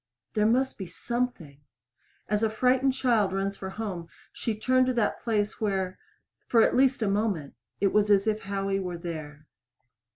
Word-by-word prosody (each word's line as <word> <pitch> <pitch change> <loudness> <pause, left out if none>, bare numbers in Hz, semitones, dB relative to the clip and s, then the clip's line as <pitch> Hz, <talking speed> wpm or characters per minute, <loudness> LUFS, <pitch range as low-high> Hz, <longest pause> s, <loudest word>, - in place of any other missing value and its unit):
There 210 0 +3
must 260 +2 +1
be 190 - -5
something. 185 - -3 0.7
As 210 0 0
a 220 - +2
frightened 255 +4 +2
child 230 -7 +2
runs 195 +1 -1
for 190 - -6
home, 190 -5 -5 0.2
she 220 -2 -3
turned 255 +3 +3
to 255 - +1
that 230 -4 0
place 215 -2 -1
where 190 -3 -1 0.5
for 230 -2 +5
at - - +2
least 260 -2 +3
a - - +1
moment 195 -7 -1 0.3
it 195 0 +2
was 210 0 +3
as 200 -1 +4
if 215 -1 +1
Howie 195 -1 -2
were 180 -2 -4
there. 155 -3 -7
210 Hz, 170 wpm, -27 LUFS, 190-235 Hz, 0.7 s, for